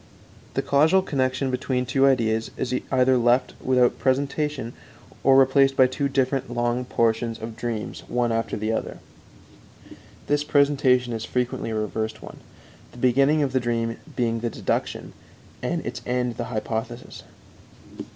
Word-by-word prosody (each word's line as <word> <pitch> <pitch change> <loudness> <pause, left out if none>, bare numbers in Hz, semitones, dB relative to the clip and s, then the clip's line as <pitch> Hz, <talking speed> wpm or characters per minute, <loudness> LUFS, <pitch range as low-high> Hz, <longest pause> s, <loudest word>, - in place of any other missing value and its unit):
The - - 0
causal 160 +7 +4
connection 130 -3 -1
between 125 0 -1
two 135 +2 +3
ideas 115 -4 +1
is 125 - -2 0.2
either 130 -1 +4
left 120 +2 +2
without 125 -1 +2
presentation, 140 -1 -1 0.5
or 135 0 +6
replaced 135 0 +4
by 130 - +7
two 140 +2 -1
different 135 -1 0
long 120 +1 -1
portions 115 -1 0
of 110 0 -7
dreams 115 -2 -4
one 120 -1 0
after 115 0 -1
the 110 +1 -2
other. 110 - -3 1.3
This 145 0 +1
presentation 140 -4 +2
is 115 -1 -4
frequently 125 -1 -2
a 110 - -3
reversed 110 +1 -3
one, - - -10 0.5
the - - -15
beginning 135 +5 +3
of 135 - -1
the 130 - +2
dream 115 -1 -1 0.2
being 115 -2 0
the 120 +1 -2
deduction, - - -3 0.5
and - - -2
its - - -5
end 125 -1 -1
the - - -3
hypothesis. 115 +1 -5
125 Hz, 145 wpm, -24 LUFS, 115-135 Hz, 1.3 s, by